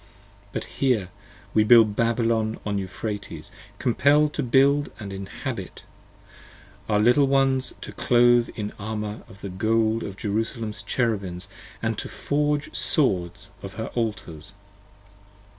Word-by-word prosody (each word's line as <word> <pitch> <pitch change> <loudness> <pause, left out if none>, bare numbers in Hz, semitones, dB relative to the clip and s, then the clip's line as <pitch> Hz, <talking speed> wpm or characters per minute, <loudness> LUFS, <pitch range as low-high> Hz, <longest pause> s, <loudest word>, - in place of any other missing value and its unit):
But - - -3
here 120 -9 0 0.4
we 110 - +5
build 110 -1 +6
Babylon 115 -1 +1
on 100 -1 -1
Euphrates, 95 -4 -6 0.3
compell'd 145 +4 +3
to - - -1
build 140 +3 +3
And 100 -3 -6
to - - -5
inhabit, 95 0 -6 1.1
our 105 -1 +3
Little 125 +6 +5
ones 135 -1 +2
to - - -7
clothe 120 -1 +4
in 105 -1 -4
armour 105 0 -4
of 100 - -15
the 100 - -5
gold 110 +4 +1
10 - - -4
Of 95 - -11
Jerusalem's 110 0 -3
Cherubims 100 -5 -2 0.3
& - - -24
to - - -2
forge 145 0 0
them 155 - -15
swords 100 - 0
of 100 0 -8
her 110 +1 -5
Altars. 105 -8 -4
110 Hz, 135 wpm, -25 LUFS, 100-125 Hz, 1.1 s, build